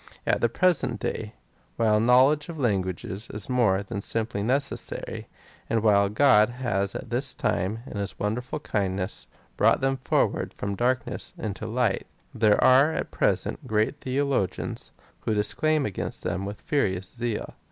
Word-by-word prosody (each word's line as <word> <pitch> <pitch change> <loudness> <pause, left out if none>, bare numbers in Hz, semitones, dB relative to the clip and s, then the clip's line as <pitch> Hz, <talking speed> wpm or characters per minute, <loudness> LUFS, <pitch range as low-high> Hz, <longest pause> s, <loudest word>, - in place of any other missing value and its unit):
At - - +1
the 120 - +3
present 155 - +2
day, 110 -1 -4 0.4
while 110 -2 +3
a - - +2
knowledge 130 +6 +4
of 165 - -6
languages 100 - -2
is 105 +4 -4
more 105 -6 +2
than 100 0 -5
simply 110 -1 -2
necessary, 135 +6 -2 0.4
and 115 -1 +1
while 100 -2 +4
Grodhas 110 -4 +2
at 120 - -7
this 125 +3 +1
time, 105 +2 -1
in 110 - -7
his 100 0 -3
wonderful 125 +8 -3
kindness, 95 -5 -2 0.3
brought - - +4
them 135 0 +1
forward 125 - 0
from 100 0 -3
darkness 120 +3 -2
into 110 0 -4
light, 115 -3 0 0.3
there 110 -2 +4
are 135 +4 +6
at - - -3
present - - +1
great 110 +6 0
theologians, 135 -7 -2 0.3
who 110 - -1
declaim 150 +8 +2
against 100 - -4
them 95 - -2
with 100 +1 -7
furious 95 -11 0
zeal. 120 -2 -3
110 Hz, 150 wpm, -26 LUFS, 100-130 Hz, 0.4 s, are